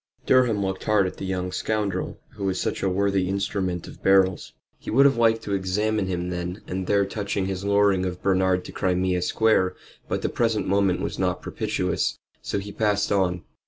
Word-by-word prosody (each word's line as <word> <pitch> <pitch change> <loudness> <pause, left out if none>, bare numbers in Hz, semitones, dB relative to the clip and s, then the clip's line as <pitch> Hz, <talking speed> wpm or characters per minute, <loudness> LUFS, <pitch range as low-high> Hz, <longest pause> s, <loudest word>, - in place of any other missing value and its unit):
Durham 120 -6 +3
looked 95 0 -4
hard 105 -2 +3
at 90 - -5
the 95 - -5
young 90 -1 -2
scoundrel 100 -1 -2
who 100 - -6
was 95 -1 0
such - - -2
a 95 - +1
worthy 95 0 +1
instrument 95 -3 -2
of - - -12
Beryl's. 95 -2 +3 0.3
He - - -8
would 140 - +5
have 140 - +5
liked 115 -1 +2
to 100 - -3
examine 100 +2 0
him 90 -1 -2
then 90 +3 -4
and 95 0 -4
there 100 -1 +3
touching 100 -1 -2
his 95 0 -3
luring 100 -2 +3
of 90 -1 -4
Bernard 95 -1 +2
to - - -8
Crimea 90 -1 0
Square, 95 -1 +2 0.3
but - - -2
the - - +2
present 115 -3 0
moment 95 -2 +2
was - - -4
not - - -1
propitious, - - -1 0.2
so - - -3
he 100 +1 -5
passed 105 -1 0
on. 90 -3 +1
95 Hz, 195 wpm, -24 LUFS, 90-105 Hz, 0.3 s, would